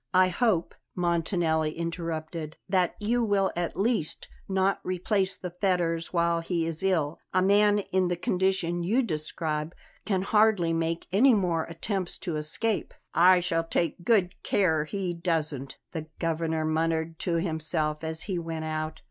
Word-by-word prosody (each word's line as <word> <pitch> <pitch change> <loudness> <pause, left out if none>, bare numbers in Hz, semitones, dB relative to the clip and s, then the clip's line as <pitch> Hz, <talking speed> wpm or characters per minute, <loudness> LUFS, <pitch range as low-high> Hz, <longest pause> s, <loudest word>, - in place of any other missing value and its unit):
"I 185 0 +6
hope," 185 -2 +1 0.2
Montanelli 165 -3 +1
interrupted, 165 -1 -4
"that 185 -2 +1
you 235 +3 +1
will 200 -3 +2
at 175 -1 -2
least 205 -7 0 0.2
not 190 0 +2
replace 190 +2 0
the 180 - -6
fetters 175 -3 0
while 170 -1 +2
he 165 0 -1
is 165 0 -2
ill. 165 -6 0 0.2
A 185 - +4
man 205 +1 +5
in 185 -1 +2
the 175 - 0
condition 180 -1 0
you 220 +10 +2
describe 155 -3 -3 0.3
can 190 -3 0
hardly 210 -5 +3
make 165 0 -1
any 235 +6 +5
more 175 -5 +1
attempts 185 +2 -3
to 170 -4 -1
escape." 180 +9 -2 0.2
"I 180 +1 +6
shall 165 -2 0
take 165 +1 -1
good 190 -4 +3
care 160 -6 +2
he 185 +2 -3
doesn't," 155 -6 -2
the 160 -2 -5
Governor 160 -1 -1
muttered 160 +1 0
to 175 - -1
himself 160 -2 0
as 160 0 -3
he 190 -4 -2
went 165 -1 -4
out. 155 0 -3
170 Hz, 150 wpm, -27 LUFS, 160-190 Hz, 0.3 s, I